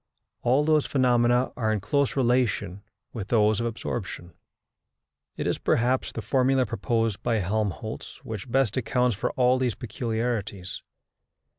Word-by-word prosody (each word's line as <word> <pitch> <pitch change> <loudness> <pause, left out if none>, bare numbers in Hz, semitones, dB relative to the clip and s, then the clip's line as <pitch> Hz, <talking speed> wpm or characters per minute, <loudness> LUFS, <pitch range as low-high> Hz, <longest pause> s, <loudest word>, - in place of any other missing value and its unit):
All 130 +4 +3
those 155 -1 +3
phenomena 125 -1 +3
are 110 -3 0
in 110 - 0
close 140 +8 0
relation 120 -7 +1 0.3
with 105 -5 -5
those 110 -2 +3
of 115 - 0
absorption. 95 -6 -5 1.0
It - - -3
is, - - 0
perhaps, 125 +2 +1
the - - -6
formula 130 -1 +2
proposed 115 -1 -1
by 120 -1 0
Helmholtz 100 -2 -3
which 110 +2 -6
best 130 -3 +2
accounts 125 -1 +1
for 100 - -1
all 125 0 +3
these 125 -4 0
peculiarities. 110 -5 -3
120 Hz, 135 wpm, -26 LUFS, 110-125 Hz, 1.0 s, All